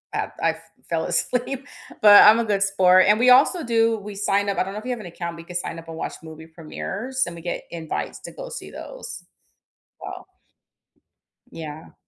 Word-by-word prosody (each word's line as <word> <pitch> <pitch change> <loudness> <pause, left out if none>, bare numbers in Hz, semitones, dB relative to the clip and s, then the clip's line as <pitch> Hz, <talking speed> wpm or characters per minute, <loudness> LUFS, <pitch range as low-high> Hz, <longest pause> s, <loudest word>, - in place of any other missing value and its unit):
I've - - -2
I've 160 0 0 0.3
fell 160 -1 0
asleep, 260 +2 -2 0.4
but 205 -1 +10
I'm 215 +2 +8
a 230 - 0
good 205 -2 0
sport, 185 -2 +5
and 210 +1 +5
we 250 +1 +5
also 295 +7 +5
do 230 -1 +2
we 205 0 -8
sign 200 0 0
up, 195 - -2
I - - +2
don't 195 +1 -7
know 210 - -5
if 225 - -13
you 255 - -2
have 245 - -3
an 210 - -9
account, 170 0 -6
we 165 - -10
could 175 +1 -5
sign 165 -1 -5
up 165 - -14
and 165 - -8
watch - - -4
movie 160 0 -11
premieres, 200 +10 -4
and 170 - -7
we 170 - -10
get 175 - -4
invites 165 -2 -5
to - - -9
go - - -9
see 485 - -8
those. - - -9 0.8
Well - - -8 1.3
Yeah. 155 -1 -9
195 Hz, 210 wpm, -23 LUFS, 165-230 Hz, 1.3 s, but